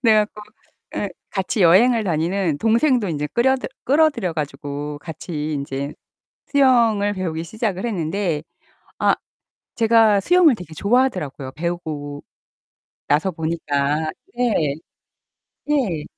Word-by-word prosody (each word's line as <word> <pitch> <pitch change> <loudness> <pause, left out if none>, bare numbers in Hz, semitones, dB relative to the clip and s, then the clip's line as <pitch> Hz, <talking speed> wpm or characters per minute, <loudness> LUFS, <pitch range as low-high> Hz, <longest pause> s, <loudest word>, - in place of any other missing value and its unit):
그래 225 -2 +5
갖고 210 0 -12 0.5
예 205 - -1 0.2
같이 195 +2 -2
여행을 220 +7 +5
다니는 170 -1 0
동생도 230 -1 +2
인제 150 -2 -2
끌여들 260 +2 +2 0.2
끌어들여 280 - +2
가지고 145 -1 -5
같이 155 -1 -5
인제 140 0 -4 0.6
수영을 230 -7 +4
배우기 165 -4 -3
시작을 210 +2 -3
했는데 175 -5 -1 0.6
아 - - +3 0.6
제가 225 -3 +4
수영을 340 - +5
되게 170 -5 -10
좋아하더라고요 185 - 0
배우고 155 -4 -4 0.9
나서 155 +6 +2
보니까. 155 -2 -1 0.3
네. 200 - +1 1.0
예. 200 - 0
180 Hz, 255 characters per minute, -21 LUFS, 150-230 Hz, 1.0 s, 그래